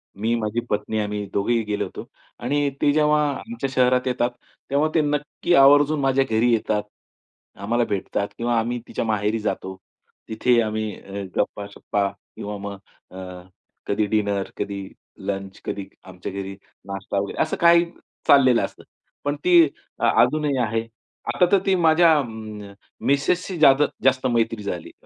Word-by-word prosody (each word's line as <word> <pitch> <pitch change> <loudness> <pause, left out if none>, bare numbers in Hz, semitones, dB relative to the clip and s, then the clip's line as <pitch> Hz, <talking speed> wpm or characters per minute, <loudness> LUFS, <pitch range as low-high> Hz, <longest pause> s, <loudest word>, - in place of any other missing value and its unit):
मी, 110 +4 -1
माझी 110 +2 -1
पत्नी 105 +1 -1
आम्ही 105 -1 -2
दोघेही 115 +3 +1
गेलो 105 -1 -2
होतो. - - -8 0.3
आणि 145 0 0
ते 145 - +4
जेव्हा 150 0 +3
आमच्या 230 - -5
शहरात 125 0 +3
येतात, 125 -1 0 0.4
तेव्हा 145 +3 +2
ते 160 - +5
नक्की 150 +3 -1
आवर्जून 145 +2 +6
माझ्या 135 -1 +2
घरी 115 +2 +3
येतात. 105 -1 0 0.7
आम्हाला 115 +5 0
भेटतात 100 0 -2
किंवा 120 0 +1
आम्ही 120 +2 -2
तिच्या - - -3
माहेरी 110 0 0
जातो. 95 -3 -3 0.5
तिथे 120 +2 +2
आम्ही 110 -1 -2
अ, 100 0 -6
गप्पा-शप्पा 100 0 -2 0.3
किंवा 105 0 -5
मग 100 0 -6 0.3
अ, 90 -1 -8 0.5
कधी 105 +1 +1
डिनर 100 -2 0
कधी 100 -1 -4 0.4
लंच, 95 -1 -4
कधी 100 -1 -4 0.2
आमच्या 90 +1 -8
घरी 100 0 -5 0.3
नाश्ता 100 0 -3
वगैरे. 100 - -3
असं 155 - 0
काही 170 0 +6 0.4
चाललेलं 130 -4 +6
असतं. - - -12 0.4
पण 145 0 -1
ती 180 - +2 0.5
अजूनही 150 -3 +2
आहे. 115 -1 0 0.5
आता 180 - +4
तर 200 - +6
ती 195 -1 +3
माझ्या 165 +1 +5
अ, - - 0 0.8
मिसेसची 170 +6 +1
जादा 145 -1 +6 0.2
जास्त 130 0 +3
मैत्री 115 -3 0
झाली, 90 -4 -5
115 Hz, 145 wpm, -23 LUFS, 100-140 Hz, 0.8 s, आवर्जून